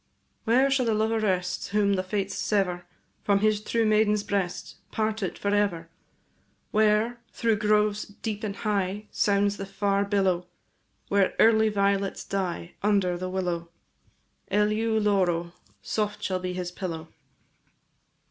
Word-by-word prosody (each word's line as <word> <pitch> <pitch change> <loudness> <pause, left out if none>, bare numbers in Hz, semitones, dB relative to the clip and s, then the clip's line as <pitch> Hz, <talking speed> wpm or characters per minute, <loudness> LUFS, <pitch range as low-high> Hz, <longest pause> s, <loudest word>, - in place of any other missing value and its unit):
Where 255 +4 +4
shall 260 -3 +2
the 220 - +2
lover 220 +1 +1
rest, 185 -3 -1
Whom 205 -1 +2
the 185 - +1
fates 195 +1 -2
sever 180 -4 0 0.4
From 200 -1 +3
his 215 -1 +2
true 225 +1 0
maiden's 210 -1 +3
breast, 195 -3 -3
Parted 215 -3 -2
for 200 0 -1
ever? 180 -5 0 0.8
Where, 215 +2 +2
through 225 -2 +1
groves 210 0 +2
deep 210 +1 -6
and 200 -2 -3
high, 200 0 -1
Sounds 200 0 +2
the 195 - -5
far 200 0 0
billow; 190 -3 +1 0.6
Where 200 -1 +2
early 220 -1 +5
violets 200 -1 0
die 180 -3 -3
Under 200 -3 +2
the 185 +1 -4
willow. 175 -2 -2 0.8
Eleu 215 +2 +1
loro, 185 -5 +1
&c. - - -22 0.3
Soft 210 -1 -2
shall 185 -2 -1
be 180 0 -3
his 180 -1 -4
pillow. 165 -4 -5
200 Hz, 140 wpm, -26 LUFS, 185-215 Hz, 0.8 s, early